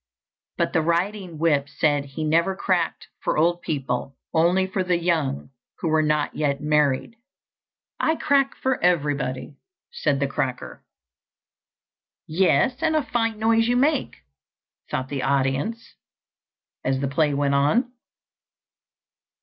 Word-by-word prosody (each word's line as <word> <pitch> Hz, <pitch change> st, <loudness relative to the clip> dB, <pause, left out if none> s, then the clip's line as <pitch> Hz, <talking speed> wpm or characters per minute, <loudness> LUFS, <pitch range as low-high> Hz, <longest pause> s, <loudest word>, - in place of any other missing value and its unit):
But -, -, 0 dB
the 165 Hz, -, +3 dB
riding 175 Hz, +2 st, -1 dB
whip 145 Hz, -3 st, +1 dB
said 145 Hz, -1 st, +1 dB
he 140 Hz, +3 st, -6 dB
never 170 Hz, +5 st, +2 dB
cracked 180 Hz, -3 st, -1 dB
for -, -, -1 dB
old 175 Hz, +2 st, +2 dB
people, 135 Hz, -3 st, -3 dB, 0.2 s
only 175 Hz, +3 st, +3 dB
for 190 Hz, 0 st, -2 dB
the 180 Hz, -1 st, +1 dB
young 160 Hz, -7 st, -1 dB, 0.3 s
who 165 Hz, -, -2 dB
were 155 Hz, 0 st, +3 dB
not 150 Hz, -1 st, 0 dB
yet 140 Hz, -2 st, 0 dB
married. 150 Hz, -, +1 dB, 0.8 s
"I 320 Hz, -, +2 dB
crack 280 Hz, -3 st, +2 dB
for 260 Hz, -6 st, -1 dB
everybody," 145 Hz, -6 st, 0 dB, 0.3 s
said 145 Hz, -, 0 dB
the 140 Hz, -, +1 dB
cracker. 135 Hz, -2 st, -4 dB, 1.4 s
"Yes, 190 Hz, -, +2 dB
and 320 Hz, -1 st, +1 dB
a 310 Hz, -, +2 dB
fine 225 Hz, -2 st, -1 dB
noise 225 Hz, +1 st, +3 dB
you 245 Hz, 0 st, +2 dB
make," 285 Hz, +2 st, +1 dB, 0.7 s
thought 130 Hz, 0 st, -3 dB
the 140 Hz, -2 st, -3 dB
audience, 140 Hz, -, -1 dB, 0.9 s
as 130 Hz, 0 st, 0 dB
the 140 Hz, -, -1 dB
play 145 Hz, +1 st, +1 dB
went 140 Hz, 0 st, +1 dB
on. 215 Hz, -, +2 dB
160 Hz, 130 wpm, -24 LUFS, 140-195 Hz, 1.4 s, the